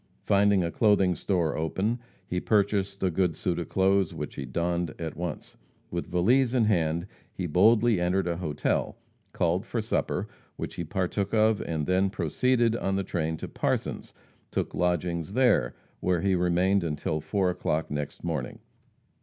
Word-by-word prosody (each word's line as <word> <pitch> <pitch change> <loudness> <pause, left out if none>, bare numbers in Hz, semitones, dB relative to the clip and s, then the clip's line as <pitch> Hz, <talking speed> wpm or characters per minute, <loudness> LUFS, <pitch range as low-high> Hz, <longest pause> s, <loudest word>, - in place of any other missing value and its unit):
Finding 100 -1 +4
a 85 - -2
clothing 100 -1 +3
store 85 -5 0
open, 95 +9 -1 0.3
he 90 - -2
purchased 100 -1 +1
a 95 - +2
good 90 -1 +1
suit 90 +1 -1
of 85 - -5
clothes, 95 -1 +2
which - - -5
he 70 - -5
donned 85 +4 -1
at 80 -3 -5
once. 85 -4 -6 0.3
With 85 0 -3
valise 120 +9 +3
in 120 -3 +4
hand, 85 -4 +1 0.3
he 95 - -4
boldly 110 +5 +4
entered 90 +1 +1
a 85 -1 -1
hotel, 75 -5 -1 0.3
called 85 +3 0
for 115 +1 -3
supper, 110 - -1 0.3
which - - -5
he 85 - -4
partook 95 +4 -1
of, 110 -1 +3
and 80 -3 -2
then 95 +3 +2
proceeded 115 - +1
on 95 -4 -1
the 100 - 0
train 80 -3 -2
to - - -6
Parsons, - - -2 0.4
took - - -2
lodgings 90 0 -1
there, 130 +1 +3 0.2
where 90 -2 +1
he 95 +1 +2
remained 90 +2 +2
until 75 -1 -2
4 90 +4 0
o'clock 80 -3 -2
next 75 -1 -4
morning. - - -3
90 Hz, 160 wpm, -27 LUFS, 85-100 Hz, 0.4 s, Finding